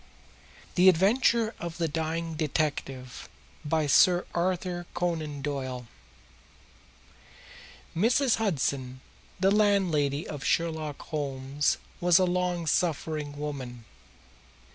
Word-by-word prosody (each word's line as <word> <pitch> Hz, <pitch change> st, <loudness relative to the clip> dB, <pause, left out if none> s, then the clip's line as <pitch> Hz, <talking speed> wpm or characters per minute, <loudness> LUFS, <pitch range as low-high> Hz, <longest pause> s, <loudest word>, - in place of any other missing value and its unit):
The 185 Hz, +1 st, +7 dB
Adventure 220 Hz, +5 st, +3 dB
of 170 Hz, -1 st, -5 dB
the 170 Hz, -1 st, 0 dB
Dying 160 Hz, +1 st, -2 dB
Detective 145 Hz, -4 st, -3 dB, 0.3 s
By 155 Hz, +1 st, +1 dB
Sir 175 Hz, +5 st, +5 dB
Arthur 175 Hz, 0 st, -1 dB
Conan 155 Hz, -5 st, -2 dB
Doyle 130 Hz, -4 st, -3 dB, 2.1 s
Mrs. 240 Hz, -, +3 dB
Hudson, 135 Hz, -, -1 dB, 0.4 s
the 190 Hz, +1 st, +3 dB
landlady 180 Hz, -9 st, +2 dB
of 145 Hz, -3 st, -6 dB
Sherlock 160 Hz, -3 st, -1 dB
Holmes, 140 Hz, -1 st, -1 dB, 0.2 s
was 175 Hz, -1 st, +5 dB
a 185 Hz, -, +4 dB
long 180 Hz, -1 st, -1 dB
suffering 155 Hz, -2 st, -1 dB
woman. 130 Hz, -6 st, -6 dB
160 Hz, 95 wpm, -28 LUFS, 145-180 Hz, 2.1 s, The